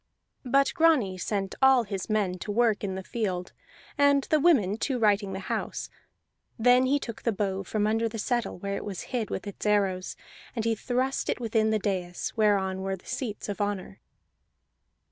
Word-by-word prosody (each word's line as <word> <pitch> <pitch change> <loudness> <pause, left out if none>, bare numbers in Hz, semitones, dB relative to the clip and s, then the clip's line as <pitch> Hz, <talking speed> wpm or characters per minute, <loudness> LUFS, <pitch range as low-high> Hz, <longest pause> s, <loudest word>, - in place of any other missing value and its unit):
But 275 +2 +3
Grani 315 - +3
sent 195 0 -2
all 265 -2 +6
his 195 -2 -5
men 200 -4 0
to 210 - -4
work 220 -1 +2
in 190 -2 -2
the 190 - -5
field, 185 -5 -3 0.5
and 285 -1 +5
the 310 - +5
women 235 - +3
to 260 +2 -1
righting 205 -3 +2
the 190 - -4
house; - - -4 0.7
then 250 +2 +5
he 280 +2 +3
took 230 -5 -7
the 230 - +1
bow 195 -2 -1
from 210 +2 -1
under 225 +1 +1
the 225 - -6
settle 240 +2 -1
where 200 +2 -3
it - - -4
was 195 -4 -5
hid 235 -4 -1
with - - -4
its 200 - -7
arrows, 195 -3 +1 0.4
and 225 -2 -2
he 230 - +2
thrust 255 +4 -1
it - - 0
within 220 -2 +1
the 220 - +2
dais 185 -4 -3
whereon 195 -4 +2
were 195 0 -2
the 185 - -19
seats 225 -6 -4
of 205 -1 -3
honor. 200 -1 -3
210 Hz, 185 wpm, -27 LUFS, 195-240 Hz, 0.7 s, all